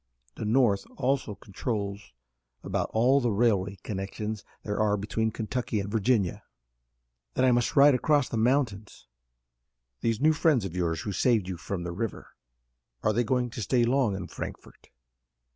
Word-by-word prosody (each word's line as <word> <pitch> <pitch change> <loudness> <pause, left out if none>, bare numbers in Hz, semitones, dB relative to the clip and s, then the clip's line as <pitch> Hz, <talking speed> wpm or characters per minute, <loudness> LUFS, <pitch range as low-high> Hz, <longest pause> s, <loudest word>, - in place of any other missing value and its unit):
The - - -6
North 105 -3 +3
also 130 -5 0
controls 100 0 -4 0.5
about - - -2
all 130 +5 +4
the 120 - +1
railway 100 -3 +1
connections 105 +2 -4 0.2
there 105 0 -3
are 105 -1 +2
between 110 +2 -1
Kentucky 110 0 -2
and 100 0 -4
Virginia." 110 -3 +1 0.9
"Then 130 - +3
I 130 - +5
must 120 -1 +1
ride 145 0 +7
across 145 +1 +2
the - - -5
mountains." 115 -3 0 0.9
"These 115 -2 0
new 155 +3 +4
friends 150 -8 +2
of 90 -2 -6
yours 85 -3 -1
who 105 - -4
saved 110 0 +2
you 95 - -3
from 85 +2 -5
the 85 - -4
river, 105 +4 -4 0.7
are 110 - +2
they 120 +3 +2
going 125 +1 0
to 115 - -6
stay 120 +2 +2
long 120 -4 +2
in 95 -1 -5
Frankfort?" - - -9
110 Hz, 160 wpm, -28 LUFS, 100-125 Hz, 0.9 s, ride